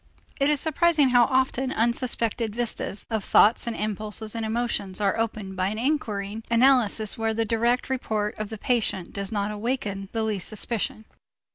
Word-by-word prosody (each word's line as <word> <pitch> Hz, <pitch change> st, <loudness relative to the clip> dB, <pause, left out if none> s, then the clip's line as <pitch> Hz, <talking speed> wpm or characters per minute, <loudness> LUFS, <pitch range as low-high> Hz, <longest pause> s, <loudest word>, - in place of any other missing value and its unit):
It 275 Hz, +1 st, +3 dB
is 300 Hz, -1 st, +4 dB
surprising 315 Hz, -2 st, +3 dB
how 245 Hz, -1 st, +6 dB
often 260 Hz, +1 st, +1 dB
unsuspected 230 Hz, -2 st, -1 dB
vistas 230 Hz, -4 st, -3 dB
of 220 Hz, -2 st, -1 dB
thoughts 220 Hz, +4 st, +4 dB
and 235 Hz, -, -2 dB
impulses 215 Hz, +1 st, -3 dB
and 230 Hz, -1 st, -3 dB
emotions 220 Hz, -4 st, -2 dB
are 200 Hz, -2 st, +1 dB
opened 215 Hz, -4 st, -3 dB
by 185 Hz, 0 st, 0 dB
an 210 Hz, +2 st, -3 dB
inquiring 225 Hz, -6 st, -2 dB
analysis 235 Hz, -3 st, +3 dB
where 225 Hz, 0 st, 0 dB
the 225 Hz, 0 st, +1 dB
direct 235 Hz, +3 st, +1 dB
report 215 Hz, -5 st, -1 dB
of 215 Hz, -1 st, -3 dB
the 220 Hz, -, -6 dB
patient 210 Hz, -6 st, -1 dB
does 200 Hz, 0 st, -4 dB
not 205 Hz, -1 st, -1 dB
awaken 210 Hz, -3 st, -3 dB
the 225 Hz, -1 st, -1 dB
least 210 Hz, -4 st, -1 dB
suspicion. 220 Hz, 0 st, -2 dB
225 Hz, 165 wpm, -25 LUFS, 210-245 Hz, -, how